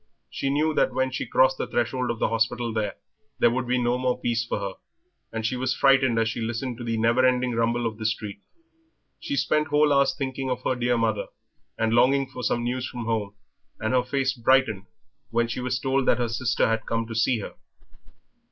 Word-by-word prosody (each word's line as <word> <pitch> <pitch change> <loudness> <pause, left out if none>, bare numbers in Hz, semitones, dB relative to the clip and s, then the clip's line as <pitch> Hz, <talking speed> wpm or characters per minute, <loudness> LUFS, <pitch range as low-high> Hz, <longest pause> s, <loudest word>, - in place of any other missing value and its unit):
She 135 - -2
knew 155 +3 +1
that 130 - +2
when 130 0 +1
she 125 - -4
crossed 130 +2 +3
the - - -2
threshold 125 +1 -1
of 115 - -2
the - - 0
hospital 115 +1 0
there 110 +2 -2
would 125 0 -2
be 125 +1 +1
no 120 0 +1
more 125 -1 0
peace 120 -1 0
for 120 - -3
her; 100 -1 -4 0.6
and 110 -1 -4
she 120 - 0
was 130 +1 -1
frightened 135 -4 +4
as 115 0 +2
she 115 +1 -3
listened 120 +2 -3
to - - -5
the 115 -1 -2
never 115 +3 +3
ending 125 -1 +2
rumble 115 +1 0
of 110 -1 -3
the 110 - -5
street. 105 -2 -4 0.8
She 290 -4 -3
spent 150 - +1
whole 150 0 +3
hours 140 0 +3
thinking 135 -1 -3
of 125 0 -3
her - - +1
dear 120 -1 0
mother, 110 -2 0 0.5
and 115 0 +1
longing 135 +3 +4
for 125 -1 -8
some 120 0 0
news 125 +1 -2
from 120 -2 -6
home, 105 -3 -2 0.4
and 110 +3 -1
her 130 - +4
face 135 +1 0
brightened 120 -5 +2 0.4
when 115 0 +1
she 120 +2 -4
was 125 0 -1
told 135 +1 0
that - - +4
her 120 -1 -1
sister 125 +2 +1
had 115 0 -1
come 115 0 -1
to 115 - -7
see 115 +2 +2
her. - - -7
120 Hz, 215 wpm, -25 LUFS, 115-130 Hz, 0.8 s, frightened